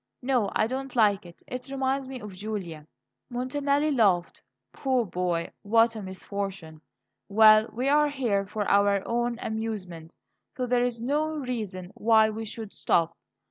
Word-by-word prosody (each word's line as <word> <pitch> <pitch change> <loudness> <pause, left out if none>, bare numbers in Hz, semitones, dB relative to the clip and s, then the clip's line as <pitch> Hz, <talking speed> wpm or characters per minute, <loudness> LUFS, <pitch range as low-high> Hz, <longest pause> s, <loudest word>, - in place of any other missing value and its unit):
No, 245 -6 +1
I - - +3
don't 265 +3 -4
like 205 -5 +3
it; 170 - -16
it 255 +1 -7
reminds 270 0 -1
me 260 -1 -6
of 210 -4 -9
Julia." 185 -6 -6 0.4
Montanelli 280 +4 0
laughed. 200 -9 +2 0.3
"Poor 260 -3 0
boy, 175 -2 -2
what 225 +2 +3
a 215 - -5
misfortune! 190 -4 -6 0.5
Well, 215 +1 +6
we 250 +4 -2
are 295 +1 +4
here 230 -9 -1
for 210 0 -3
our 200 -1 +3
own 240 0 0
amusement, 200 -7 -5 0.4
so 255 - -1
there 245 0 +2
is 240 -2 -2
no 290 +6 0
reason 215 -9 -4
why 220 -1 +4
we 220 +1 -5
should 220 -1 -7
stop. 170 0 +1
220 Hz, 150 wpm, -27 LUFS, 195-250 Hz, 0.5 s, Well